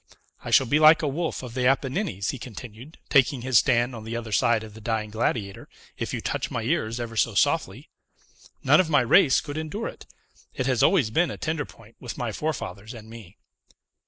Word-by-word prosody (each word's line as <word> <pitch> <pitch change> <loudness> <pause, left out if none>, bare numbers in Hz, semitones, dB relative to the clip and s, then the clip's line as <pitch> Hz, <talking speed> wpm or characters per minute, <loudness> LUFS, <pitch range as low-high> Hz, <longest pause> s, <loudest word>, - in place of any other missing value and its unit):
"I - - -6
shall - - +5
be 145 +6 +2
like 155 +1 +7
a - - +1
wolf 155 +1 -3
of 125 -2 -8
the 125 0 +1
Apennines," 135 - 0
he 135 - -8
continued, 120 +4 -10
taking 135 -2 +3
his 130 -2 +5
stand 125 -1 +1
on 115 -2 -8
the 110 +1 -5
other 115 -2 -5
side 110 +2 +2
of 110 -1 -11
the 110 - -12
Dying 110 -1 -2
Gladiator, 110 -3 -3 0.3
"if - - -4
you - - -3
touch - - -3
my - - -3
ears 115 +2 -1
ever 115 -1 -5
so 110 -1 +1
softly. 140 - 0 0.8
None 145 +3 +5
of 185 -3 +2
my 145 -3 +4
race 135 +3 +4
could 145 +1 -6
endure 180 +9 -4
it. - - -13 0.5
It 130 - -2
has 130 -3 +1
always 145 - +3
been 170 +7 +2
a - - -6
tender 160 -2 -2
point 115 0 -18
with 125 - -7
my 120 -2 -3
forefathers 110 - -5
and 110 -1 -12
me." 110 -5 -12
125 Hz, 210 wpm, -25 LUFS, 110-145 Hz, 0.8 s, like